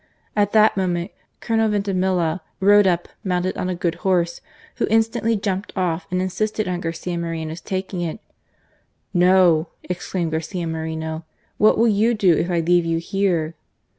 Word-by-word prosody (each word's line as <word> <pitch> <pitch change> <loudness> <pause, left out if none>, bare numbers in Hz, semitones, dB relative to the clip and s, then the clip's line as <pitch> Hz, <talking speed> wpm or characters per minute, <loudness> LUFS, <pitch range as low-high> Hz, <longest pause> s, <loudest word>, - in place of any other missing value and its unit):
At 205 -1 +2
that 215 0 +5
moment 180 -1 -1 0.3
Colonel 225 -1 +1
Vintimilla 185 -4 0 0.2
rode 205 +1 +6
up 175 -1 +1 0.2
mounted 180 -1 -1
on 180 - -2
a 180 - -1
good 170 -1 -1
horse, 175 -3 +1 0.4
who - - 0
instantly 225 +1 +2
jumped 200 -1 -2
off" 180 -3 -1
and 180 - -1
insisted 215 +3 -1
on 180 -1 -2
Garcia 170 +1 -3
Moreno's 165 -1 -4
taking 185 0 -3
it. 170 +4 -3 0.5
" - - -43 0.2
No! 175 -4 +4
" - - -45
exclaimed 180 -1 -3
Garcia 165 +3 -3
Moreno. 160 0 -4 0.2
" - - -41
What 215 - +5
will 230 +2 +4
you 220 +2 +3
do 190 -5 +4
if 175 - -1
I 170 -2 +1
leave 175 +1 +3
you 165 0 0
here?" 170 -3 0
180 Hz, 165 wpm, -22 LUFS, 170-200 Hz, 0.5 s, rode